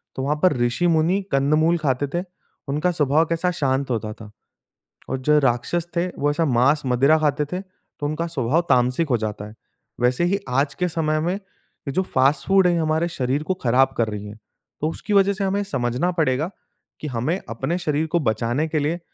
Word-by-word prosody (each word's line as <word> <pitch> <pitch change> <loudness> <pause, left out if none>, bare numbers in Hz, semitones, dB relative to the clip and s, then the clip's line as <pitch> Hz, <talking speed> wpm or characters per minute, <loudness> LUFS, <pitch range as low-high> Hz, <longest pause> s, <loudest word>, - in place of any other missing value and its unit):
तो 130 - -3
वहाँ 145 +2 +1
पर 185 - +5
ऋषि-मुनि 165 +9 +2
कंद-मूल 155 +5 +3
खाते 145 -3 0
थे। 175 - 0 0.5
उनका 150 +6 +1
स्वभाव 155 0 +2
कैसा 165 +2 0
शांत 135 -4 -1
होता 110 -2 -2
था। 105 -1 -12 0.8
और - - -1
जो 150 +3 +3
राक्षस 135 +6 0
थे 175 +2 +1
वो 145 - +2
ऐसा 160 +2 0
मांस-मदिरा 135 +2 +3
खाते 150 -1 +1
थे 180 - -1
तो 185 -5 -12
उनका 160 +3 -2
स्वभाव 155 0 +1
तामसिक 125 +5 +2
हो 120 - +3
जाता 105 -2 -4
है। 105 - -12 0.5
वैसे 125 +7 +2
ही 195 +3 +1
आज 140 +3 +1
के 180 +4 0
समय 155 -2 0
में, 175 +3 0
ये 195 -7 -11
जो 185 - +2
फास्ट 135 -3 +1
फूड 195 -1 +5
हैं 175 - +3
ये 170 - +1
हमारे 160 +1 +1
शरीर 135 +1 -1
को 185 - 0
खराब 135 -4 +2
कर 115 -2 +2
रही 105 -1 -6
हैं। 105 +1 -10 0.4
तो 155 - +1
उसकी 205 +5 -4
वजह 200 0 +4
से 195 0 -3
हमें 195 +1 0
समझना 135 -1 -1
पड़ेगा 155 -1 0 0.5
कि 155 - -4
हमें 130 +8 -1
अपने 135 +9 -2
शरीर 160 -2 -1
को 170 +2 +1
बचाने 120 +4 0
के 155 -1 -1
लिए 155 +4 -1
150 Hz, 200 wpm, -22 LUFS, 130-170 Hz, 0.8 s, पर